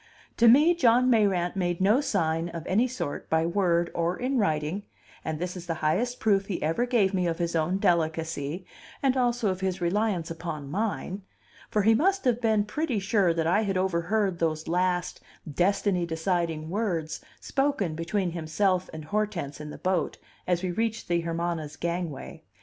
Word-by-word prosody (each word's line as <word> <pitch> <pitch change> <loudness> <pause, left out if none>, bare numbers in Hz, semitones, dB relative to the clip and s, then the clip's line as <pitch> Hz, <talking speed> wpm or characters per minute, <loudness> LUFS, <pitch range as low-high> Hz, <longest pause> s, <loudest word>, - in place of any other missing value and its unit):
To 235 - +5
me 295 +9 +7
John 255 -5 +4
Mayrant 195 -6 +2
made 175 -2 -1
no 210 +8 +4
sign 165 - 0
of 165 -1 -7
any 220 +7 +2
sort 255 - -5
by 160 0 +2
word 170 -1 +1
or 170 +1 0
in 255 +1 0
writing, 160 0 0 0.4
and 160 -1 -3
this 180 +3 -4
is 180 -1 -8
the 165 - -1
highest 245 +11 +1
proof 200 -2 +2
he 190 - -2
ever 165 +11 +1
gave 215 -6 +2
me 180 -2 +1
of 165 -1 -1
his 170 -1 -2
own 165 +4 +1
delicacy, 165 -2 0 0.4
and 270 -1 +3
also 240 -4 +1
of 185 0 -5
his 190 -1 -1
reliance 180 -1 0
upon 160 -4 -5
mine; 200 0 -2 0.5
for 210 - +1
he 220 +2 +6
must 380 - +2
have 245 -1 +2
been 220 -3 +3
pretty 275 +2 -1
sure 195 -2 +2
that 165 -1 0
I 180 +6 +3
had 195 -3 -1
overheard 185 +1 0
those 160 -1 -1
last 180 +1 0 0.3
destiny 180 +2 +1
deciding 165 -1 -1
words 180 -7 -2 0.2
spoken 270 - 0
between 175 +3 -1
himself 180 +3 0
and 155 -1 -8
Hortense 175 -7 -2
in 150 - -7
the - - -8
boat, 185 -3 -1 0.3
as 180 0 +1
we 185 - -1
reached 225 +3 -2
the 170 -1 +2
Hermana's 165 -2 -3
gangway. 170 -4 -4
180 Hz, 175 wpm, -27 LUFS, 165-215 Hz, 0.5 s, me